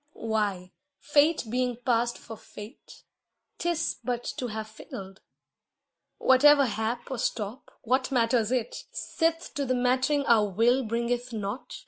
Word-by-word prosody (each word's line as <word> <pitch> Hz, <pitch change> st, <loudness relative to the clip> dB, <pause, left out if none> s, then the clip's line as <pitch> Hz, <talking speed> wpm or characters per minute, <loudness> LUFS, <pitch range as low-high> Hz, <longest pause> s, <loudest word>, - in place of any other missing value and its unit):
Why, 205 Hz, -5 st, -2 dB, 0.3 s
fate 295 Hz, +2 st, +3 dB
being 250 Hz, +1 st, 0 dB
past 240 Hz, -1 st, +1 dB
for 225 Hz, -, -10 dB
Fate, 215 Hz, +3 st, -13 dB, 0.6 s
'tis 340 Hz, -1 st, -1 dB
but 245 Hz, 0 st, -2 dB
to 250 Hz, -, -2 dB
have 220 Hz, -1 st, -5 dB
failed. 195 Hz, -3 st, -10 dB, 1.0 s
Whatever 280 Hz, +2 st, +6 dB
hap 225 Hz, +3 st, -3 dB
or 260 Hz, -, -3 dB
stop, 220 Hz, +1 st, -3 dB
what 255 Hz, +3 st, +1 dB
matters 230 Hz, -2 st, +2 dB
it, 245 Hz, -2 st, -2 dB
Sith 330 Hz, 0 st, -1 dB
to 285 Hz, -, -2 dB
the 255 Hz, -1 st, 0 dB
mattering 255 Hz, +3 st, +1 dB
our 215 Hz, -3 st, +4 dB
will 235 Hz, +7 st, +3 dB
bringeth 240 Hz, +2 st, -2 dB
nought? 215 Hz, -, -5 dB
240 Hz, 130 wpm, -27 LUFS, 220-260 Hz, 1.0 s, Whatever